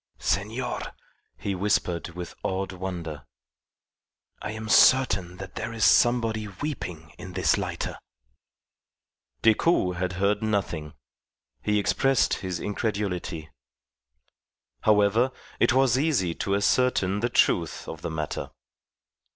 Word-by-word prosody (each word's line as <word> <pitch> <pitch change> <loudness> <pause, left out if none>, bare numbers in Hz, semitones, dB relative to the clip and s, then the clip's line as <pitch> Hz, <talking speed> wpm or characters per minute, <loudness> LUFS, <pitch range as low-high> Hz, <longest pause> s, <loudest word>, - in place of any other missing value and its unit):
"Senor," 115 +5 -1 0.6
he 100 - -3
whispered 90 -3 0
with 90 -1 -6
awed 95 0 -2
wonder, 85 -6 -6 1.1
"I - - -4
am 110 +1 -6
certain 100 -8 +4
that 95 0 -8
there 115 - -4
is 110 -3 +1
somebody 115 -1 +3
weeping 90 - -6
in 95 - -8
this - - +2
lighter." - - -4 1.4
Decoud 110 - +3
had 90 0 -2
heard 100 +3 +1
nothing. 100 -8 -2 0.7
He 105 0 +1
expressed 135 +5 +2
his 90 -3 -3
incredulity. 100 -7 -3 1.3
However, 105 - +3 0.3
it - - +4
was 130 0 +3
easy 135 - +1
to 100 +4 -1
ascertain 100 -2 +2
the 120 +3 0
truth 85 -8 +1
of 80 - -7
the - - -3
matter. 80 -1 -4
100 Hz, 110 wpm, -26 LUFS, 90-110 Hz, 1.4 s, certain